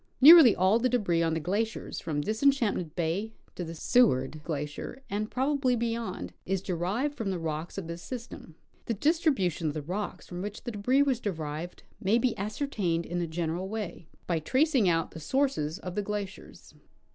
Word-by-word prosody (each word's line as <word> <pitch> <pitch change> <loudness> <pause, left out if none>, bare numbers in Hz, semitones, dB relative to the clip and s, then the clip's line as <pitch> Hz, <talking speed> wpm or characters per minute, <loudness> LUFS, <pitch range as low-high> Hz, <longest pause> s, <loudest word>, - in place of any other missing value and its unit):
Nearly 295 -4 +10
all 190 +5 +3
the 255 +2 +2
debris 195 -9 +1
on 165 -1 +1
the - - 0
glaciers 205 +8 -2
from 150 -3 -2
Disenchantment 220 - +1
bay 180 +7 -1 0.2
to 180 - -5
the 165 0 -6
Seward 155 - +2
glacier, 150 - -5
and 210 +2 -1
probably 265 -1 +1
beyond, 230 - -3
is 190 0 -2
derived 195 - -1
from 225 -7 -3
the 190 - -1
rocks 160 +1 -4
of 195 - -4
this 170 +1 -6
system. 235 -9 -8 0.3
The 230 - 0
distribution 245 - +1
of 150 - -2
the 155 - -3
rocks 190 +7 -4
from 175 0 -6
Avhich 205 +2 -6
the 240 - -4
debris 250 +7 +2
was 265 -4 +1
derived 165 -4 -5 0.2
may 205 +5 +3
be 240 0 +1
ascertained 200 - -2
in 175 +1 -2
a 170 - -1
general 170 +3 -3
way 210 -6 -5 0.2
by 170 -2 0
tracing 260 - +2
out 165 -1 +1
the - - -8
sources 185 - 0
of 180 - -7
the 210 - -1
glaciers. 205 -1 -6
195 Hz, 180 wpm, -29 LUFS, 165-235 Hz, 0.3 s, Nearly